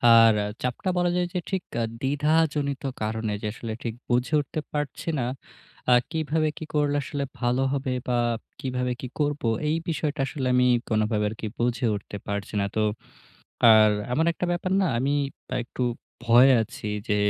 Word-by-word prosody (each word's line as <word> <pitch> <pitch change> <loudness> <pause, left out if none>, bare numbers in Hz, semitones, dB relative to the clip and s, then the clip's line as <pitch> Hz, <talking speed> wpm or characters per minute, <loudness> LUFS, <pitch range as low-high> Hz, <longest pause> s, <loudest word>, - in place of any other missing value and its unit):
আর 115 -1 +8 0.3
চাপটা 125 +9 -2
বলা 175 0 +2
যায় 180 - +2
যে 180 - 0
ঠিক 190 -2 -1 0.4
দ্বিধাজনিত 145 0 +1 0.2
কারণে 110 0 -1
যে 105 - -2
আসলে 115 -1 -5
ঠিক 115 - -2 0.2
বুঝে 125 +4 +1
উঠতে 145 +2 -5
পারছি 150 0 -4
না। - - 0 0.7
আ - - +8 0.2
কিভাবে 155 -1 0
কি 160 - -6
করলে 145 -1 +2
আসলে 140 0 -3 0.2
ভালো 125 +1 +1
হবে 135 -2 -1 0.2
বা 125 -1 +1 0.4
কিভাবে 125 -1 -2
কি 130 - -4
করব 145 0 0 0.3
এই 155 - +2
বিষয়টা 150 -3 -1
আসলে 135 -1 -3
আমি 125 0 +4 0.2
কোনোভাবে 110 -1 +1
আরকি 110 +1 -6
বুঝে 120 +1 0
উঠতে 100 0 -7
পারছি 100 0 -3
না 100 - +1
তো। - - +1 0.9
আর 110 -1 +7 0.2
এমন 160 +5 +2
একটা 180 - -2
ব্যাপার 175 +1 -2
না 190 - +3
আমি 135 +4 +1 0.5
একটু 125 - -7 0.4
ভয়ে 120 +3 +7
আছি 110 0 -7 0.2
যে 105 - +3
130 Hz, 165 wpm, -26 LUFS, 115-150 Hz, 0.9 s, আর